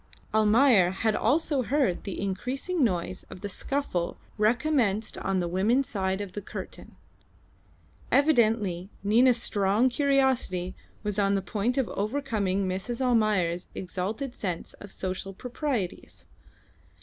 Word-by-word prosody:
Almayer 220 Hz, -2 st, +5 dB
had 210 Hz, +3 st, 0 dB
also 295 Hz, -2 st, +2 dB
heard 255 Hz, -7 st, 0 dB
the 195 Hz, -, -4 dB
increasing 255 Hz, -, -2 dB
noise 185 Hz, -4 st, -1 dB
of 180 Hz, -, -10 dB
the 205 Hz, -, -3 dB
scuffle 195 Hz, -6 st, -2 dB, 0.2 s
recommenced 225 Hz, -1 st, +1 dB
on 195 Hz, -1 st, 0 dB
the 175 Hz, -, -1 dB
women's 215 Hz, +10 st, +2 dB
side 190 Hz, -1 st, -1 dB
of 200 Hz, -2 st, -6 dB
the 205 Hz, -, -4 dB
curtain. -, -, -8 dB, 1.2 s
Evidently 220 Hz, -, +3 dB
Nina's 235 Hz, +4 st, +5 dB
strong 210 Hz, +2 st, +2 dB
curiosity 260 Hz, -10 st, +1 dB, 0.3 s
was 210 Hz, -1 st, -1 dB
on 200 Hz, 0 st, +3 dB
the 195 Hz, -, 0 dB
point 220 Hz, +6 st, -1 dB
of 265 Hz, -5 st, +2 dB
overcoming 205 Hz, -4 st, -1 dB
Mrs. 190 Hz, +6 st, -3 dB
Almayer's 215 Hz, -9 st, +1 dB
exalted 205 Hz, +8 st, -3 dB
sense 180 Hz, -8 st, -4 dB
of 205 Hz, -, -10 dB
social 190 Hz, +1 st, -4 dB
proprieties. 245 Hz, -, -4 dB
210 Hz, 125 wpm, -27 LUFS, 190-255 Hz, 1.2 s, Almayer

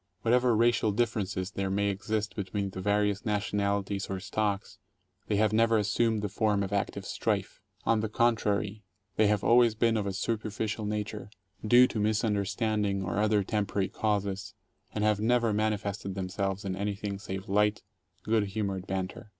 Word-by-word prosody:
What 115 Hz, -, +3 dB
ever 125 Hz, -2 st, +4 dB
racial 115 Hz, -1 st, +3 dB
differences 100 Hz, -4 st, -1 dB
there 95 Hz, 0 st, -2 dB
may 100 Hz, +1 st, +1 dB
exist 105 Hz, +2 st, -2 dB
between 100 Hz, 0 st, -3 dB
the 95 Hz, -, -6 dB
various 105 Hz, +1 st, +1 dB
national 100 Hz, -2 st, 0 dB
ities 100 Hz, 0 st, -4 dB
or 95 Hz, -1 st, -3 dB
stocks, 100 Hz, 0 st, -2 dB, 0.5 s
they 105 Hz, -, +1 dB
have 105 Hz, +1 st, +2 dB
never 115 Hz, 0 st, +4 dB
assumed 110 Hz, +1 st, +1 dB
the -, -, +1 dB
form 105 Hz, 0 st, +1 dB
of 100 Hz, +1 st, -4 dB
active 100 Hz, -, -2 dB
strife. -, -, -2 dB, 0.2 s
On 115 Hz, -1 st, +3 dB
the 110 Hz, 0 st, -2 dB
contrary, 105 Hz, -2 st, +1 dB, 0.3 s
they 110 Hz, -, +5 dB
have 105 Hz, -1 st, +1 dB
always 120 Hz, -1 st, +5 dB
been 115 Hz, 0 st, +2 dB
of 105 Hz, -2 st, -1 dB
a 100 Hz, -, -2 dB
superficial 105 Hz, +1 st, -2 dB
nature, 105 Hz, 0 st, -4 dB, 0.3 s
due 120 Hz, +4 st, +7 dB
to 120 Hz, -, -3 dB
misunderstanding 105 Hz, -1 st, 0 dB
or 95 Hz, +2 st, -2 dB
other 105 Hz, -1 st, +3 dB
temporary 100 Hz, -1 st, -1 dB
causes, 100 Hz, -2 st, -2 dB, 0.4 s
and 105 Hz, -, -2 dB
have 105 Hz, -1 st, +2 dB
never 115 Hz, 0 st, +2 dB
manifested 105 Hz, -2 st, -1 dB
themselves 95 Hz, +1 st, -2 dB
in 95 Hz, -1 st, -2 dB
anything 100 Hz, 0 st, -3 dB
save 95 Hz, -1 st, -6 dB
light, 105 Hz, +2 st, +2 dB, 0.4 s
good 110 Hz, -1 st, +2 dB
humored 100 Hz, -2 st, -3 dB
banter. 95 Hz, +2 st, -4 dB
105 Hz, 165 wpm, -29 LUFS, 100-110 Hz, 0.5 s, due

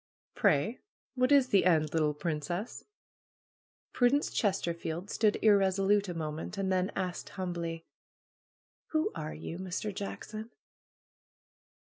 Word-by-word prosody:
^^Pray, 215 Hz, -, +2 dB, 0.3 s
what 255 Hz, 0 st, +2 dB
is 275 Hz, -3 st, +6 dB
the 200 Hz, -5 st, +4 dB
end, 155 Hz, -4 st, +3 dB
little 155 Hz, -2 st, +2 dB
princess? 170 Hz, +6 st, -3 dB, 0.5 s
' -, -, -65 dB
Prudence 265 Hz, +4 st, +3 dB
Chesterfield 175 Hz, -2 st, -1 dB
stood 215 Hz, -2 st, +2 dB
irresolute 200 Hz, -1 st, +4 dB
a 175 Hz, -, -4 dB
moment 155 Hz, +4 st, -4 dB
and 195 Hz, -1 st, 0 dB
then 185 Hz, +1 st, +1 dB
asked 180 Hz, -2 st, -3 dB
humbly: 170 Hz, -3 st, -3 dB, 1.1 s
"Who 310 Hz, 0 st, +2 dB
are 155 Hz, -1 st, -5 dB
you, 165 Hz, +2 st, -6 dB
Mr. 190 Hz, +3 st, -3 dB
Jackson?" 215 Hz, +3 st, -6 dB
185 Hz, 115 wpm, -31 LUFS, 165-210 Hz, 1.1 s, is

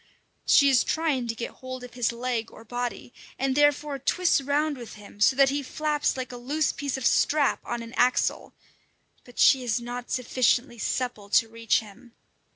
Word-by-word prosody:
She 280 Hz, -, +6 dB
is 265 Hz, -4 st, +4 dB
trying 300 Hz, -7 st, -1 dB
to 225 Hz, -, -3 dB
get 235 Hz, -, -5 dB
hold 255 Hz, -1 st, -7 dB
of 250 Hz, -, -10 dB
his 245 Hz, -2 st, 0 dB
leg 235 Hz, -1 st, -3 dB
or 225 Hz, -, -14 dB
body, 245 Hz, +1 st, -5 dB, 0.2 s
and 270 Hz, 0 st, 0 dB
therefore 290 Hz, -1 st, +2 dB
twists 345 Hz, +3 st, +2 dB
round 290 Hz, +2 st, 0 dB
with 240 Hz, -4 st, -10 dB
him 205 Hz, -1 st, -14 dB
so 260 Hz, -, +5 dB
that 275 Hz, 0 st, +5 dB
he 285 Hz, +1 st, -1 dB
flaps 295 Hz, +1 st, -1 dB
like 255 Hz, 0 st, -5 dB
a 245 Hz, -, -7 dB
loose 285 Hz, +5 st, 0 dB
piece 280 Hz, -2 st, -3 dB
of 260 Hz, -, -5 dB
strap 295 Hz, -2 st, +2 dB
on 240 Hz, -1 st, -4 dB
an 230 Hz, +1 st, -11 dB
axle; 250 Hz, 0 st, +1 dB, 0.7 s
but 245 Hz, -, -17 dB
she 265 Hz, -2 st, +5 dB
is 240 Hz, -1 st, 0 dB
not 245 Hz, +1 st, -7 dB
sufficiently 245 Hz, 0 st, 0 dB
supple 230 Hz, -4 st, -3 dB
to 225 Hz, -, +4 dB
reach 230 Hz, 0 st, 0 dB
him. 225 Hz, +3 st, -15 dB
250 Hz, 185 wpm, -26 LUFS, 235-280 Hz, 0.7 s, She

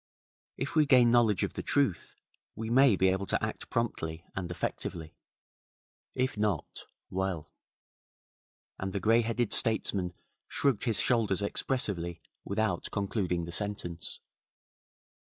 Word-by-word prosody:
If 135 Hz, +4 st, -3 dB
we 155 Hz, -2 st, +5 dB
gain 125 Hz, -3 st, +6 dB
knowledge 115 Hz, -5 st, +4 dB
of -, -, -2 dB
the -, -, -4 dB
truth, 135 Hz, -, 0 dB, 0.4 s
we 110 Hz, +1 st, -4 dB
may 130 Hz, -3 st, +6 dB
be 95 Hz, 0 st, +3 dB
able 95 Hz, +1 st, -1 dB
to -, -, 0 dB
act -, -, -6 dB
promptly 85 Hz, -8 st, -2 dB
and 90 Hz, -3 st, -3 dB
effectively. 85 Hz, -1 st, -4 dB, 1.0 s
If 130 Hz, -4 st, 0 dB
not 105 Hz, -7 st, -1 dB, 0.3 s
well 95 Hz, -4 st, -2 dB, 0.6 s
' -, -, -72 dB
and 95 Hz, 0 st, -3 dB
the 100 Hz, -, 0 dB
greyheaded 115 Hz, +2 st, +2 dB
statesman 95 Hz, -5 st, +1 dB, 0.3 s
shrugged 135 Hz, -6 st, +1 dB
his 115 Hz, -4 st, +2 dB
shoulders 105 Hz, -6 st, +2 dB
expressively 95 Hz, -7 st, -2 dB, 0.2 s
without 100 Hz, -3 st, -1 dB
concluding 95 Hz, -4 st, -1 dB
the 85 Hz, -, -7 dB
sentence. 90 Hz, -3 st, -2 dB
100 Hz, 125 wpm, -30 LUFS, 90-115 Hz, 1.0 s, gain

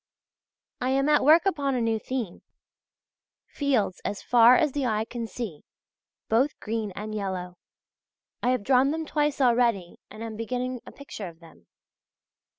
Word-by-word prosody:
I 250 Hz, -, -1 dB
am 275 Hz, +1 st, +2 dB
at 295 Hz, -, +4 dB
work 320 Hz, +5 st, +6 dB
upon 285 Hz, -8 st, 0 dB
a -, -, 0 dB
new 225 Hz, -1 st, 0 dB
theme: 235 Hz, -7 st, -4 dB, 1.0 s
fields 245 Hz, -10 st, -1 dB
as 200 Hz, 0 st, -4 dB
far 240 Hz, 0 st, +6 dB
as 300 Hz, +2 st, +2 dB
the 275 Hz, -2 st, -1 dB
eye 215 Hz, -1 st, 0 dB
can 235 Hz, 0 st, -5 dB
see, 215 Hz, -11 st, -6 dB, 0.6 s
both 255 Hz, +7 st, +1 dB
green 220 Hz, -1 st, -3 dB
and 215 Hz, +1 st, -6 dB
yellow. 185 Hz, -3 st, -4 dB, 0.8 s
I 245 Hz, -, +1 dB
have 255 Hz, -4 st, +1 dB
drawn 260 Hz, +3 st, +4 dB
them 320 Hz, +2 st, -2 dB
twice 295 Hz, -1 st, 0 dB
already 235 Hz, -8 st, +2 dB
and 220 Hz, -, -9 dB
am 225 Hz, -2 st, -6 dB
beginning 250 Hz, +2 st, -3 dB
a -, -, -9 dB
picture 250 Hz, -8 st, -8 dB
of 165 Hz, -1 st, -12 dB
them. 160 Hz, -, -18 dB
240 Hz, 155 wpm, -26 LUFS, 215-270 Hz, 1.0 s, work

